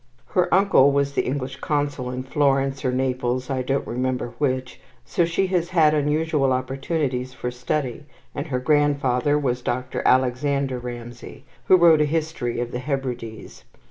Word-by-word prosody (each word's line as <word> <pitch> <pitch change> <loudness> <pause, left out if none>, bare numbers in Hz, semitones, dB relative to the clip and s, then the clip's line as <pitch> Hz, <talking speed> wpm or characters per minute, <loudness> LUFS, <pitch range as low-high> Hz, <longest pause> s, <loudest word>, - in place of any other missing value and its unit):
Her 180 -1 +1
uncle 185 -8 +5
was 140 0 0
the - - 0
English 135 0 -3
Consul 145 -3 -2
in 125 0 -4
Florence 135 -1 +1
or 130 - +1
Naples, 130 0 -1
I 130 -1 0
don't 135 +2 -1
remember 125 0 -2
which, 130 -2 -2 0.2
so 170 - +1
she 170 +3 0
has 175 -1 +1
had 160 -4 +4
unusual 150 -1 +1
opportunities 130 0 -2
for 125 - -4
study; 125 +2 -3 0.3
and 145 +2 -4
her 130 -4 -1
grandfather 145 -1 +2
was 125 -4 -1
Dr. 125 +1 -3
Alexander 130 +1 +1
Ramsay, 120 -1 -9 0.2
who 185 - +7
wrote 165 -3 +6
a - - +4
history 150 -6 -2
of 120 0 -3
the 125 - -3
Hebrides. 125 - -5
135 Hz, 155 wpm, -23 LUFS, 125-150 Hz, 0.3 s, who